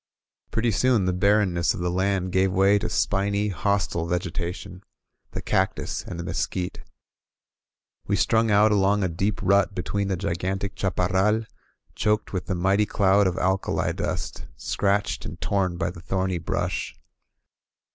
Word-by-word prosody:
Pretty 115 +1 0
soon, 110 0 +2
the 90 - +1
barrenness 95 -2 +2
of - - -7
the 90 0 -1
land 95 0 0
gave 95 +1 +2
way 100 +2 +4
to 90 - -3
spiny, 100 +5 0
hostile 95 -4 -1
vegetation, 90 +1 -4 0.2
— - - -50
the - - -5
cactus - - -1
and 85 - -6
the - - -3
mesquite. 85 +3 -3 1.3
We 100 - +2
strung 110 +2 +2
out 105 +1 +5
along 100 0 +3
a - - +2
deep 95 +5 -1
rut 100 +1 +3
between 100 +2 -2
the 95 -2 -1
gigantic 95 +1 -2
chaparral, 95 +3 +1 0.5
choked 105 -1 0
with 90 - -3
the 95 - -1
mighty 95 +4 +2
cloud 100 0 +3
of 90 - -2
alkali 95 +1 0
dust, - - -4
scratched 100 +10 0
and 80 +2 -7
torn 90 +2 0
by 85 0 -1
the 85 - -11
thorny 95 -1 -1
brush. 85 - -2
95 Hz, 150 wpm, -25 LUFS, 90-100 Hz, 1.3 s, out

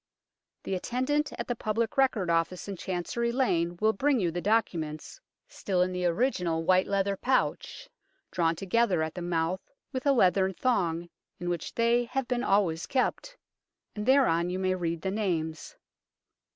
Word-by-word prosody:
The - - -3
attendant 255 +10 -1
at - - -5
the 245 - -1
Public 225 0 -1
Record 240 -10 +2
Office 165 +3 0
in 200 - -4
Chancery 190 +7 -2
Lane 175 -9 0
will 220 +1 +3
bring 275 +4 +2
you 175 -4 0
the 175 +2 -3
docu 210 -4 +1
ments, 155 - -7 0.3
still 185 -3 0
in 185 - -2
the 180 0 -2
original 175 -5 0
white 185 +2 +3
leather 200 0 0
pouch, 260 - -1 0.4
drawn 165 -1 +1
together 195 -1 +1
at 160 - -4
the 180 - -6
mouth 170 +1 -1 0.3
with 260 +1 -3
a - - +6
leathern 190 -5 +3
thong, 175 -9 0 0.3
in 175 - -3
which 175 -3 -4
they 235 +1 +3
have 255 +1 -3
been 250 -1 -1
always 190 -7 +1
kept, - - -1 0.6
and 210 +1 -4
thereon 180 -11 +4
you 180 - -2
may 185 0 +1
read 170 -3 -3
the 190 - -1
names. 165 -6 -2
190 Hz, 165 wpm, -28 LUFS, 175-235 Hz, 0.6 s, a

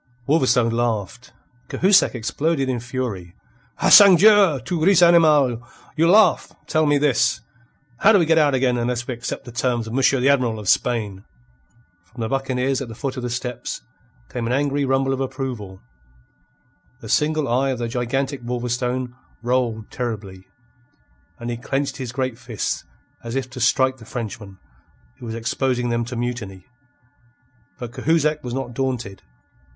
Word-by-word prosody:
Wolverstone 125 -6 +2
laughed. 115 +1 -3 0.4
Cahusac 190 -5 +3
exploded 135 +5 -1
in 125 -2 -1
fury. 115 -8 -5 0.4
"Ah, - - +1
sangdieu! 200 -4 +7
Tu 165 0 -2
ris, 195 0 +5
animal? 155 -8 +4 0.3
You 165 +2 +3
laugh! 205 -3 +4
Tell 155 -1 +1
me 145 0 +3
this: 135 -5 +1 0.6
How 220 - +5
do 210 - +6
we 175 - +2
get 160 0 +3
out 145 -3 +3
again 125 -1 +1
unless 120 0 -2
we 130 - -2
accept 120 +1 -6
the 120 - -9
terms 120 -1 -1
of 110 - -7
Monsieur 135 +1 +2
the 125 - +1
Admiral 125 -5 +2
of 105 -2 -8
Spain?" 105 -5 0 0.8
From 115 +7 -12
the 110 - -2
buccaneers 135 0 -1
at 135 - -5
the 115 - -9
foot 135 +2 -4
of 130 - -5
the 125 - -4
steps 120 0 -5 0.5
came 120 -2 -4
an 120 - -1
angry 140 +1 0
rumble 135 0 +1
of 135 - -3
approval. 130 -8 -5 1.2
The - - -9
single 155 -1 +1
eye 130 +3 +1
of 130 - -2
the 120 0 -3
gigantic 130 +3 -2
Wolverstone 125 +1 -3 0.3
rolled 120 -3 -1
terribly, 100 -6 -6 0.9
and 120 0 -5
he 120 - -4
clenched 135 +2 -3
his 130 -3 -5
great 130 -2 -3
fists 120 -5 -4 0.4
as 115 +1 -6
if 130 -2 -3
to 125 - -8
strike 130 +2 +2
the 115 - -14
Frenchman, 105 -4 -7 0.6
who 120 - -9
was 110 - -5
exposing 125 +1 -1
them 120 0 -1
to 125 +1 -7
mutiny. 115 -6 -5 1.1
But 120 -2 -7
Cahusac 155 +1 0
was 125 0 -5
not 130 -2 -4
daunted. 120 -6 -3
125 Hz, 160 wpm, -21 LUFS, 120-135 Hz, 1.2 s, sangdieu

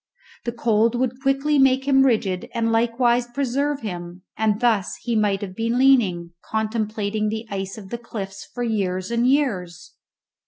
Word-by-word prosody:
The 235 - -1
cold 230 0 +2
would 255 +1 -1
quickly 275 +2 +2
make 265 0 +3
him 270 -1 +5
rigid 215 -8 0
and 230 -1 +1
likewise 240 +1 +2
preserve 275 +3 -1
him, 180 -3 -6
and 215 -1 +1
thus 225 -6 +1
he 235 -2 -1
might 205 -2 +1
have 190 -2 -6
been 230 +2 -1
leaning, 215 -11 +3 0.2
contemplating 215 -1 -1
the 220 +1 -4
ice 195 0 -4
of 195 -3 -11
the 235 - -4
cliffs, 195 -4 -7
for 245 - -4
years 195 -3 -1
and 235 +2 +2
years! 205 - -1
225 Hz, 160 wpm, -23 LUFS, 200-250 Hz, 0.2 s, him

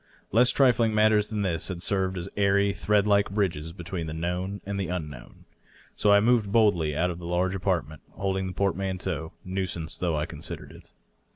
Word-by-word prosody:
Less 120 +4 +5
trifling 120 -5 +3
matters 105 -1 +4
than 105 -2 -2
this 85 -4 -1
had 95 -3 -4
served 95 +1 0
as 85 +1 -4
airy 100 0 +3
thread 105 0 +2
like 100 -1 +3
bridges 90 -6 -1
between 85 -1 -5
the 80 - -5
known 90 +4 -3
and 100 0 -3
the 95 - -2
unknown. 75 -8 -7 0.5
So 105 - +3
I 100 - +7
moved 110 -2 +2
boldly 90 -9 +3
out 90 +2 +1
into 85 - -7
the 85 - -7
large 90 +2 0
apartment^ 85 -5 -1
holding 95 -1 -2
the 95 - -5
portmanteau^ 95 -4 -2 0.2
nuisance 90 -3 -3
though 85 -3 0
I 75 0 -1
considered - - -8
it. - - -15
95 Hz, 185 wpm, -27 LUFS, 85-100 Hz, 0.5 s, I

